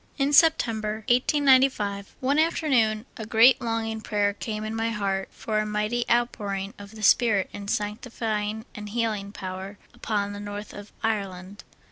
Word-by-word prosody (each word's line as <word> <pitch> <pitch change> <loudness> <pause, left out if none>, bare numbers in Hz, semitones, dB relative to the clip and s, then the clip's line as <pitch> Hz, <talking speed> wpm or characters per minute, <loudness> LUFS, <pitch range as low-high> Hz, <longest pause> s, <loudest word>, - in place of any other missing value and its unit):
In 280 0 +1
September, 220 -9 +3
1895, 255 -6 +3
one 275 +3 +2
afternoon 255 -9 +2
a 220 - -5
great 240 +4 +6
longing 225 -1 -2
prayer 205 -1 0
came 215 +1 -5
in 215 +1 -4
my 225 0 0
heart 195 -3 -2
for 215 -1 -2
a 215 - 0
mighty 210 +3 -1
outpouring 205 -4 0
of 200 +1 -11
the 215 - -9
Spirit 210 -3 +4
in 200 -1 -7
sanctifying 215 0 -3
and 210 0 -8
healing 215 -3 -2
power 190 +1 -7 0.2
upon 205 -2 -2
the 205 - -7
north 205 0 -7
of 205 0 -10
Ireland. 200 -3 -3
215 Hz, 150 wpm, -26 LUFS, 205-235 Hz, 0.2 s, great